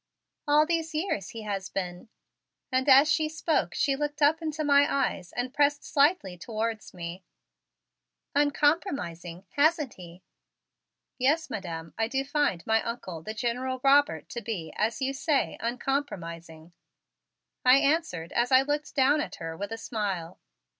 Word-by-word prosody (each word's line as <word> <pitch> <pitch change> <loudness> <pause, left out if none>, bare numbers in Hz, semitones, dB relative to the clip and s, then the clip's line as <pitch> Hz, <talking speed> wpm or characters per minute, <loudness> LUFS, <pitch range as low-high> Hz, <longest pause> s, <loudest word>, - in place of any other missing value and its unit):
All 300 +1 +5
these 325 -1 -1
years 305 - -2
he 225 -1 -8
has 200 -2 -4
been" 180 +3 -5 0.6
and 260 +2 +1
as 275 +3 +8
she 310 0 +2
spoke 315 +1 -1
she 275 -2 +2
looked 295 0 -3
up 305 +2 +4
into 310 -1 -3
my 285 -1 +5
eyes 190 -10 -1
and 250 +1 -3
pressed 290 0 +2
slightly 280 - +2
towards 220 +1 -3
me 175 +1 -7 1.1
"uncompromising, 280 - 0
hasn't 300 -2 +2
he?" 175 0 -13 1.0
"Yes, 300 +6 +1
Madam, 165 -5 -5
I 225 - +2
do 270 +3 -1
find 285 - 0
my 225 0 +3
Uncle, 190 -8 -5
the 215 +6 -6
General 250 +3 -2
Robert, 285 +2 +4
to 235 - -5
be, 190 -8 -5
as 225 +5 -1
you 270 +1 0
say, 280 +1 0
uncompromising," 175 - -4 0.9
I 255 +1 +7
answered 275 - 0
as 240 +2 +1
I 260 +1 +7
looked 295 +1 -3
down 285 +2 +4
at - - -5
her 165 -1 -6
with 200 +5 -5
a 225 - -3
smile. 195 -7 -4
255 Hz, 145 wpm, -28 LUFS, 190-290 Hz, 1.1 s, as